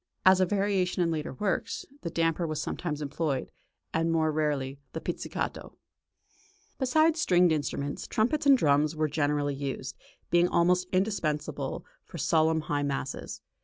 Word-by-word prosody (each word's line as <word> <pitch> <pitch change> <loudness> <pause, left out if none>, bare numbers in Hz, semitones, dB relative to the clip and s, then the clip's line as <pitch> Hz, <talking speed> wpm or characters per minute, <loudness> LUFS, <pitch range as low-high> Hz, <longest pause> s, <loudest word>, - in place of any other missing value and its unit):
As 185 0 +7
a 185 - +3
variation 195 -3 +1
in 165 - +1
later 155 -1 -3
works, 205 -2 -2 0.2
the 170 - -3
damper 165 0 0
was 155 -1 -3
sometimes 150 -1 -3
employed, 145 -1 -2 0.4
and 165 +1 +1
more 160 -1 +2
rarely, 145 -3 -1
the 160 - -3
pizzicato. - - -4 1.0
Besides 310 +5 +3
stringed 180 - +4
instruments, 145 -2 -2
trumpets 280 +7 +1
and 275 -1 +8
drums 150 - +2
were 155 0 +1
generally 145 -1 0
used, 140 -1 -4 0.4
being 175 0 +5
almost 180 +1 +2
indispensable 185 -6 -1 0.2
for - - -10
solemn 160 0 +2
high 145 -1 -1
mass. 140 -1 -4
160 Hz, 140 wpm, -28 LUFS, 150-185 Hz, 1.0 s, and